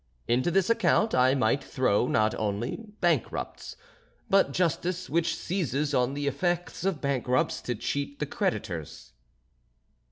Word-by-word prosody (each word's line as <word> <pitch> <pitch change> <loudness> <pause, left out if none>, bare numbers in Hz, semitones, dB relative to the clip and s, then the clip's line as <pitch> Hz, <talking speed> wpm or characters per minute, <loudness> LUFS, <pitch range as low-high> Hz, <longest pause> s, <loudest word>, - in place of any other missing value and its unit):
Into 125 +7 +2
this 190 +1 +2
account 225 -1 +2
I 130 +1 +4
might 130 +1 +1
throw 125 -3 +1
not 110 0 +2
only 105 +3 -2 0.2
bankrupts, 170 - -1 0.6
but 195 -7 +4
Justice 180 +3 -1
which 170 +1 +1
seizes 150 -5 -1
on 125 +1 +1
the 145 0 -3
effects 175 +5 -1
of 190 -5 -1
bankrupts 130 -2 0
to 120 - -3
cheat 140 +5 -3
the 150 - -2
creditors." 90 - -3
140 Hz, 130 wpm, -28 LUFS, 125-175 Hz, 0.6 s, I